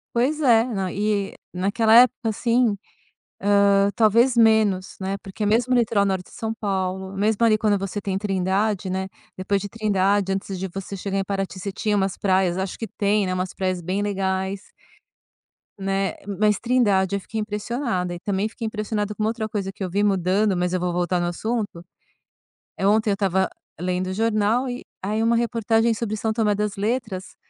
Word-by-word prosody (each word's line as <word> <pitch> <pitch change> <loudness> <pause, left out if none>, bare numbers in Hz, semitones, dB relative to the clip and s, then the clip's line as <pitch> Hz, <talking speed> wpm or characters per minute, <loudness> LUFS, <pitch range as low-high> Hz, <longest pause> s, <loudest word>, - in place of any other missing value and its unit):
Pois 275 +6 +1
é. 235 -5 +5
Na 195 -7 -3
e 205 -1 -1 0.2
naquela 210 +5 +2
época, 245 -1 +5
assim, 235 0 +2 0.9
hã, 200 0 +4
talvez 230 +3 +4
menos, 220 -4 +3
né, 195 +1 -2
porque 195 +2 -5
mesmo 235 +4 +2
no 245 - +5
litoral 215 -3 +2
norte 190 -2 -1
de - - -15
São 220 0 -2
Paulo, 190 -2 -3
mesmo 215 +3 +2
ali 215 -1 +4
quando 210 -1 +2
você 195 +1 -4
tem 195 -1 -2
Trindade, 195 0 0
né, 190 +1 -2 0.3
depois 195 +1 0
de 205 - -5
Trindade 200 -2 +1
antes 195 0 -4
de 190 - -2
você 195 +2 -7
chegar 195 +1 -3
em 195 - +1
Paraty, 195 -1 -3
você 200 +2 -4
tinha 210 +2 -1
umas 195 -2 0
praias, 185 -2 +2
acho 190 0 -3
que 225 - -5
tem, 205 0 +1
né, 185 - -1
umas 185 0 -2
praias 185 -1 -1
bem 185 +4 -2
legais 190 -1 -2 1.0
né. 195 0 -1 0.2
Mas 210 -1 +3
Trindade, 205 -6 +2
eu - - -1
fiquei 220 +3 -5
impressionada 210 -3 -2
e 175 - -7
também 200 +2 -1
fiquei 230 0 -7
impressionada 210 -1 -2
com 215 - -2
uma 215 - +2
outra 225 -1 -3
coisa 200 -3 -3
que 195 - -7
eu 185 - -2
vi 200 +4 0
mudando, 195 +1 +2
mas 180 0 0
eu 185 - +1
vou 180 0 -1
voltar 175 0 0
no 175 - 0
assunto. 200 -1 -3 0.9
Eh, 195 - -1
ontem 215 +1 +3
eu - - +3
estava 190 -1 +1 0.3
lendo 180 +1 -1
o 185 - -3
jornal 225 +4 +1
e 245 +1 -5 0.2
aí 210 +3 -1
uma 230 +1 +3
reportagem 230 -1 +2
sobre 215 -1 -3
São 220 +1 -1
Tomé 215 -2 +1
das 210 0 -2
Letras, 210 -2 -3
200 Hz, 190 wpm, -23 LUFS, 190-220 Hz, 1.0 s, é